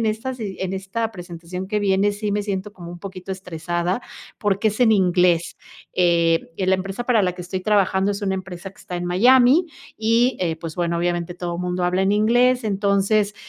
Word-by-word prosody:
en 225 - 0
estas 225 +4 -2
si 210 -5 -5
en 190 0 -2
esta 195 +4 -3
presentación 180 -1 -7
que 210 +1 -1
viene 200 +1 +2
sí 205 0 -3
me 205 0 0
siento 200 0 -4
como 175 -3 -10
un 175 - -9
poquito 190 -1 -7
estresada, 175 +1 -3 0.4
porque 205 +1 +1
es 215 +2 -4
en 225 -3 +5
inglés. 180 -3 +2 0.4
Eh, 170 -2 +2
la 190 0 +2
empresa 195 +5 -4
para 235 -4 +3
la 180 -1 +1
que 180 0 -8
estoy 185 +2 -4
trabajando 195 -1 +2
es 200 - -6
una 195 -1 0
empresa 185 0 -7
que - - -24
está 180 - -8
en 175 - -4
Miami 250 - +5 0.3
y, 230 +3 +2
eh, 170 -3 0
pues, 165 0 -8
bueno, 170 -1 0
obviamente 175 0 -1
todo 175 -1 -4
mundo 180 0 -2
habla 180 +2 +1
en 195 +1 +2
inglés, 245 +4 +3
entonces, 200 0 +1
190 Hz, 200 wpm, -22 LUFS, 180-210 Hz, 0.4 s, en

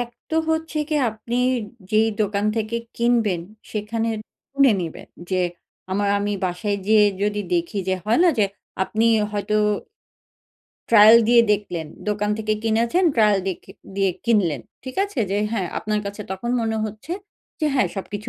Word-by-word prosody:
১ 240 - -2 0.2
তো 320 - 0
হচ্ছে 320 -1 -1
গিয়ে 305 -2 +1
আপনি 230 +3 -5 0.5
যেই 220 +1 +4
দোকান 205 0 0
থেকে 220 +1 -1 0.2
কিনবেন, 230 -6 +2 0.3
সেখানে 225 +2 -2 0.4
শুনে 275 -3 +4
নেবেন 165 -2 -6 0.2
যে, 185 - +1 0.5
আমার 200 +1 +1
আমি 205 0 -1
বাসায় 200 +3 -1
গিয়ে 215 -1 +6 0.2
যদি 210 0 0
দেখি 340 -11 -1
যে 190 - +2
হয় 225 +6 +2
না - - +6
যে 210 - +5 0.4
আপনি 220 +3 0 0.3
হয়তো 210 +1 -1 1.4
ট্রায়াল 215 +1 +9
দিয়ে 235 -1 +7
দেখলেন। 180 -6 -3 0.2
দোকান 210 0 0
থেকে 215 0 0
কিনেছেন 230 +11 +2
ট্রায়াল 210 -3 +4
দিয়ে 185 - -1
কি - - -13 0.2
দিয়ে 195 -1 +2
কিনলেন। 185 - +2 0.2
ঠিক 260 - -7
আছে? 360 -12 -4
যে 200 - +1
হ্যাঁ, 190 -6 -1
আপনার 210 0 -1
কাছে 205 +1 -5
তখন 235 +5 -4
মনে 225 0 -1
হচ্ছে 215 +10 -6 0.5
যে 305 - +2
হ্যাঁ, 255 - +3
সবকিছু 205 +3 -5
215 Hz, 160 wpm, -22 LUFS, 205-235 Hz, 1.4 s, ট্রায়াল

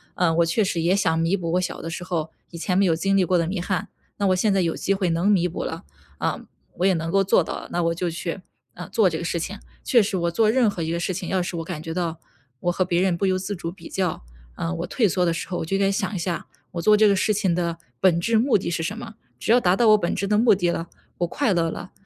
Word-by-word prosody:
嗯， 165 -3 +2
我 170 - +5
确 170 +7 +1
实 185 -4 0
也 170 +3 +2
想 180 -5 +2
弥 165 +4 +1
补 170 -3 -3
我 180 - +2
小 180 - -4
的 165 - -5
时 170 +1 -5
候 165 -3 -3 0.2
以 170 - -9
前 180 +2 -1
没 200 - +4
有 175 -4 +3
经 195 +5 +1
历 195 - +4
过 180 +1 +2
的 170 -1 +1
遗 180 0 -2
憾。 185 +1 -2 0.3
那 200 - +1
我 185 - +3
现 200 +3 +2
在 195 - +2
有 170 -3 0
机 195 - 0
会 190 -2 0
能 165 +2 0
弥 180 -3 +3
补 170 - -5
了， - - -5 0.3
啊， - - -2 0.4
我 180 - +2
也 195 - +4
能 165 0 -3
够 195 +3 +3
做 190 - +4
到 165 - -4
了， - - -8
那 175 - 0
我 165 0 +1
就 175 +1 -1
去， 170 +2 -4 0.3
呃， 180 - -9
做 215 -5 +3
这 160 - -3
个 170 - -5
事 170 0 -1
情。 195 +5 -4 0.3
确 235 -4 +5
实 195 -1 -1
我 170 -1 0
做 215 +5 +3
任 240 -2 +3
何 175 -4 -4
一 160 - -2
个 170 - -1
事 185 - -1
情， 180 0 -5
要 190 -1 +1
是 175 0 -4
我 165 - -3
感 165 -2 -6
觉 165 0 -5
到 165 -2 -2 0.4
我 175 - 0
和 185 - +1
别 175 -1 0
人 185 -2 +2
不 185 - -1
由 185 -1 +2
自 195 +2 -4
主 170 -2 -5
比 185 - -12
较， 185 - -2 0.3
啊， 85 +5 -3
我 - - -4
退 225 - +2
缩 180 0 +1
的 170 - +1
时 165 - -4
候， 180 - -3
我 - - -3
就 195 +4 0
应 - - -1
该 195 - +3
想 195 0 -1
一 - - -2
下， 170 0 -3 0.2
我 170 - -4
做 210 +4 +5
这 215 0 +6
个 200 - +4
事 215 +3 +2
情 195 -4 +1
的 170 -1 -1 0.2
本 175 -3 +4
质 225 +6 +2
目 240 +2 +3
的 180 - -4
是 170 -1 -2
什 200 +6 -3
么？ 230 -2 -8 0.2
只 - - 0
要 245 - +6
达 180 -3 +3
到 230 +3 +3
我 215 - +7
本 175 -4 -1
质 195 - -2
的 210 +1 +2
目 225 0 +5
的 180 -2 +1
了， 170 0 -2 0.3
我 175 - +2
快 225 +3 0
乐 165 -2 +1
了， 185 - -8
180 Hz, 330 characters per minute, -23 LUFS, 170-195 Hz, 0.4 s, 我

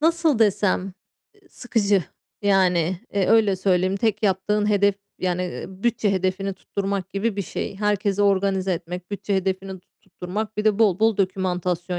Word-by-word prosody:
Nasıl 325 -4 +2
desem, 205 -3 +2
ııı, 190 +1 -7 0.6
sıkıcı, 205 -7 0 0.4
yani, 185 -3 +2 0.2
eee, 195 -2 +2
öyle 220 -4 +4
söyleyeyim, 185 0 +1
tek 215 0 0
yaptığın 210 +1 +1
hedef 200 -1 +3 0.2
yani, 180 -1 -1
eee, 180 - -5
bütçe 205 +2 0
hedefini 190 +1 -1
tutturmak 195 0 -4
gibi 200 +2 -1
bir 200 - -1
şey. 195 - -5
Herkesi 205 0 0
organize 195 -1 +2
etmek, 180 +1 -6
bütçe 200 0 -2
hedefini 190 0 -3
tut - - -49
tutturmak, 200 +4 -6
bir 210 - -1
de 215 -1 +3
bol 205 -5 +3
bol 220 -1 +3
dokümantasyon 180 -2 -1
195 Hz, 155 wpm, -23 LUFS, 185-210 Hz, 0.6 s, öyle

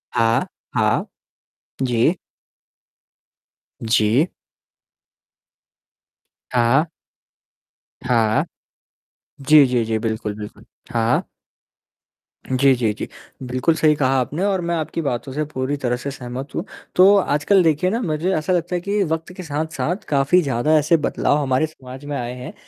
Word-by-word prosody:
हाँ, 115 0 +2 0.3
हाँ। - - +2 0.8
जी। 125 +4 +2 1.7
जी। 115 +6 +2 2.3
हाँ। 125 +7 +3 1.2
हाँ। 115 -3 +2 1.0
जी, 150 +1 +6
जी, 125 -2 +1
जी, 110 0 -1
बिल्कुल, 110 -2 -3
बिल्कुल। 105 0 -9 0.3
हाँ। 115 0 +1 1.2
जी, 130 +1 +4
जी, 115 -3 0
जी। - - -6 0.4
बिल्कुल 130 +6 0
सही 155 -1 +3
कहा 135 -2 +2
आपने 150 +8 -2
और 195 -2 +1
मैं 170 - 0
आपकी 160 +1 -3
बातों 135 -1 -3
से 155 +2 -1
पूरी 140 -1 -3
तरह 125 -3 -1
से 140 +3 -5
सहमत 130 +1 -7
हूँ। - - -1 0.3
तो 195 +3 +7
आजकल 185 +2 +2
देखिए 165 +2 +2
ना 230 +5 -1
मुझे 165 0 -1
ऐसा 155 +4 0
लगता 175 0 -1
है 175 - 0
कि 200 +2 0
वक़्त 160 0 -3
के 185 - -6
साथ-साथ 155 +3 -3
काफ़ी 140 +5 +3
ज़्यादा 140 +1 +2
ऐसे 155 +3 +3
बदलाव 150 -1 0
हमारे 135 +2 +1
समाज 130 -2 -12
में 145 0 -4
आए 120 0 -4
हैं, 125 0 -8
140 Hz, 130 wpm, -21 LUFS, 125-160 Hz, 2.3 s, तो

